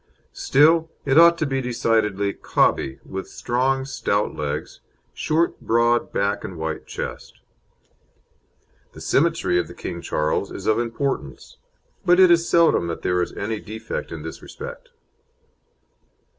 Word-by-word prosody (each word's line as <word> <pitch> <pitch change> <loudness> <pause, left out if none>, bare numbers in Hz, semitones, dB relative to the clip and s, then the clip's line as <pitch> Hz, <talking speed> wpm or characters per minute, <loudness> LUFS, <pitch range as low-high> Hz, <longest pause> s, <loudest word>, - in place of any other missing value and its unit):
Still, 160 +3 +3 0.2
it 135 +2 +5
ought 170 0 +7
to 155 - 0
be 135 -2 -1
decidedly 110 -5 0
"cobby," 65 - 0
with 95 0 -6
strong, 130 +2 -1
stout 105 -6 -1
legs, 75 -2 -4 0.3
short 165 +2 0
broad 120 +1 +2
back 100 +1 -1
and 90 - -7
wide 80 -1 -4
chest. - - -7 1.5
The - - -12
symmetry 160 - +2
of 90 - -2
the - - -12
King - - -6
Charles 75 +5 -1
is 95 - -8
of 110 - +2
importance, 115 - -4 0.5
but 180 0 +4
it 185 -2 +7
is 170 0 +3
seldom 165 - +4
that 85 - -5
there 90 0 +1
is 90 - -2
any 110 +1 -3
defect 110 +2 -6
in - - -7
this - - -8
respect. - - -9
120 Hz, 140 wpm, -23 LUFS, 100-160 Hz, 1.5 s, ought